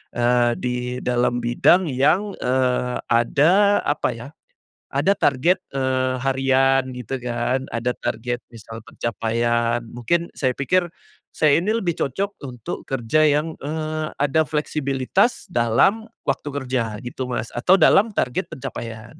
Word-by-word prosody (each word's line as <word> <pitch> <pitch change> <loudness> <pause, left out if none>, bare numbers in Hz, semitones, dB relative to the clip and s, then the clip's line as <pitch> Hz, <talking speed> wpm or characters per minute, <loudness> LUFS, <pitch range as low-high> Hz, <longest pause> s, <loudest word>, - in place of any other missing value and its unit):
eee, 120 0 +3
di 125 0 -3
dalam 120 -1 0
bidang 155 +8 +3
yang, 160 +11 +2
eee, 125 -1 0
ada 165 - +4
apa - - 0
ya, - - -9 0.6
ada 195 - +1
target, 170 +7 +2 0.2
eee, 130 -1 0
harian 135 0 +2
gitu 125 +2 -5
kan, 125 +2 -2
ada 120 +1 0
target 120 +1 -3
misal 115 0 -10
pencapaian 115 +1 -1
mungkin 170 +9 -1
saya 130 -2 -1
pikir 175 +6 +1 0.5
saya 155 0 +4
ini 215 +4 0
lebih 180 -8 -2
cocok 200 +9 -4
untuk 125 -3 -7
kerja 135 +4 +2
yang, 155 +2 -2
eee, 155 +1 -3
ada 145 +3 +2
fleksibilitas 150 - 0
dalam 150 - +2 0.2
waktu 140 +2 -2
kerja 125 -6 -2
gitu 125 +1 -5
Mas 115 -2 -3
atau 175 +10 +4
dalam 205 +2 +4
target 125 - -1
pencapaian. 120 0 -8
130 Hz, 130 wpm, -22 LUFS, 120-155 Hz, 0.6 s, ada